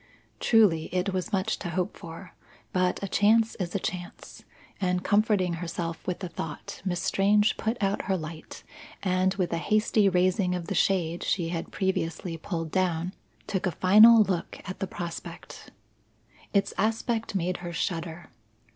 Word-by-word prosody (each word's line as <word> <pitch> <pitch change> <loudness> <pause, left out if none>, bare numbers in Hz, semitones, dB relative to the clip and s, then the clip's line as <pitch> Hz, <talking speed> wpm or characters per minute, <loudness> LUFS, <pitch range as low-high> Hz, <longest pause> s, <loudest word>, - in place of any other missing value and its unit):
Truly, 200 -9 +4
it 185 +2 -1
was 185 +1 -2
much 190 -2 0
to 175 - -4
hope 180 +3 -2
for, 170 +1 -10 0.4
but 185 +1 +1
a - - -1
chance 220 +3 +3
is 180 0 -3
a - - +2
chance; 180 -1 -6 0.4
and 180 -1 0
comforting 205 -4 +2
herself 170 -1 -4
with 180 0 -2
the 185 - -3
thought, 160 -3 -7
Miss 180 -2 -1
Strange 210 +2 +3
put 225 +2 -2
out 195 0 0
her 190 -1 +1
light, 160 -1 -8 0.4
and, 185 0 +2
with 185 -4 -1
a 170 - 0
hasty 215 +1 +3
raising 185 0 +2
of 175 -2 -4
the - - -3
shade 175 -3 +1
she 170 -4 0
had 165 -1 -4
previously 180 -3 -2
pulled 165 -1 -4
down, 180 -1 0 0.3
took 190 -1 -1
a - - 0
final 215 +6 +7
look 185 -4 -3
at 185 - -6
the 195 - -2
prospect. 170 -1 -8 0.8
Its 200 -1 +1
aspect 225 0 0
made 180 -1 0
her 175 -1 -6
shudder. 165 0 -4
185 Hz, 160 wpm, -27 LUFS, 170-200 Hz, 0.8 s, final